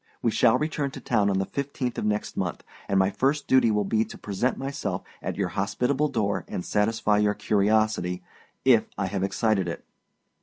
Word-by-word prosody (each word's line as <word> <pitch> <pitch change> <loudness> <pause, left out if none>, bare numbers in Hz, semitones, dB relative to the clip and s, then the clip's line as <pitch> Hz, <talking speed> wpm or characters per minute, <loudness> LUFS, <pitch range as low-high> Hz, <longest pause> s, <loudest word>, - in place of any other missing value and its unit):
We 115 - +3
shall 115 +1 +4
return 150 -2 -1
to - - -9
town 105 -4 +1
on 95 - +1
the 95 - 0
15th 140 -2 -3
of - - -2
next 105 0 -1
month, - - -3 0.3
and 100 - +2
my 95 +1 +3
first 140 +7 0
duty 130 -3 +4
will 105 -1 +2
be 110 +3 +2
to - - -10
present 105 +5 -1
myself 135 -9 -3 0.2
at - - -3
your 95 -3 -1
hospitable 125 +9 0
door 100 -8 -1
and 90 - -4
satisfy 105 0 +1
your 105 0 +2
curiosity, 105 -3 +1 0.4
if 120 -4 +5
I 95 - 0
have 95 0 -2
excited 100 -1 +1
it. 85 - -5
105 Hz, 190 wpm, -26 LUFS, 100-125 Hz, 0.4 s, if